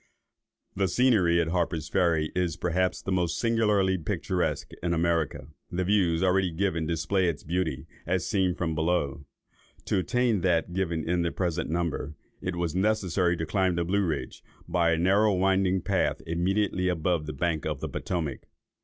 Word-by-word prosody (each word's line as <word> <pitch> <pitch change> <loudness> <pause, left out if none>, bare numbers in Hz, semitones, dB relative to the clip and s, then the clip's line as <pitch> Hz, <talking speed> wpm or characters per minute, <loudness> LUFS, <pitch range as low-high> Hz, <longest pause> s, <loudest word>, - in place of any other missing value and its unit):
The 95 0 +1
scenery 100 -9 +3
at 80 -1 +1
Harper's 80 -3 -1
Ferry 85 -3 +1
is, 90 -3 -1
perhaps, 90 +1 0
the 95 - -3
most 85 -2 0
singularly 105 -5 +2
picturesque 75 - -2
in 85 0 0
America. 80 -4 0 0.2
The 90 +1 -1
Views 90 -3 +2
already 95 0 +3
given 85 -2 -1
display 85 +3 +1
its 80 - -5
beauties, 85 -4 -2 0.2
as 90 -1 0
seen 95 -4 +1
from 85 -3 -2
below. 80 -3 -1 0.6
To - - +1
attain 120 0 +1
that 90 -1 +1
given 85 -4 -1
in 90 +1 +1
the 85 - +1
present 85 -2 -2
number, 80 -2 -2 0.3
it 90 -1 -3
was 85 -2 -2
necessary 95 -3 +1
to 80 - -2
climb 95 +1 +1
the 85 0 0
Blue 100 +3 +1
Ridge, 80 -4 -3 0.2
by 85 -1 +2
a - - +1
narrow 100 +4 +3
winding 95 -1 +2
path, 95 0 0
immediately 90 +3 0
above 85 -2 0
the - - -3
bank 80 +2 -1
of 75 -3 -3
the - - -3
Potomac. 80 -7 -4
90 Hz, 165 wpm, -27 LUFS, 85-95 Hz, 0.6 s, scenery